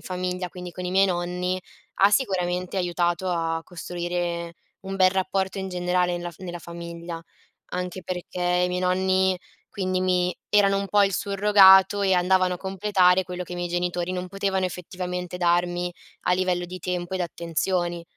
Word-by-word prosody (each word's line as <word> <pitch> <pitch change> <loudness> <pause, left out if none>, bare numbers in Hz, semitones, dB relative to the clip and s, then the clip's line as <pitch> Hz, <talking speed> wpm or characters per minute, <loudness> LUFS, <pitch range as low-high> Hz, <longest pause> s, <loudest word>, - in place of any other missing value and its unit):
famiglia 180 0 -3
quindi 180 0 -8
con 180 - -6
i 180 - -2
miei 195 +1 +4
nonni, 180 +1 -2 0.4
ha 200 +1 +7
sicuramente 185 -5 0
aiutato 175 0 0
a 165 -2 -1
costruire 175 -1 -4 0.3
un 195 0 -5
bel 185 -1 +5
rapporto 190 0 -1
in 190 0 -3
generale 180 0 0
nella 175 0 -5
fa 185 - -16
nella 175 -1 -5
famiglia. 170 0 -7 0.5
Anche 180 +1 -4
perché 180 0 -5
i 180 0 +2
miei 180 0 -2
nonni 185 0 +2 0.3
quindi 185 -3 -2
mi 180 -1 +1
erano 200 -1 +4
un 200 - -2
po' 205 +2 +4
il 195 - 0
surrogato 195 0 +6
e 190 -1 +3
andavano 185 0 +3
a - - -5
completare 190 -1 +2
quello 180 0 -5
che 180 - -9
i - - -3
miei 175 0 -3
genitori 175 0 -1
non 180 0 -3
potevano 195 0 -1
effettivamente 180 0 -5
darmi 175 0 +1 0.3
a - - +2
livello 180 -1 +1
di 180 +1 -7
tempo 180 0 -3
ed 185 - -2
attenzioni. 175 0 -1
180 Hz, 170 wpm, -25 LUFS, 175-190 Hz, 0.5 s, ha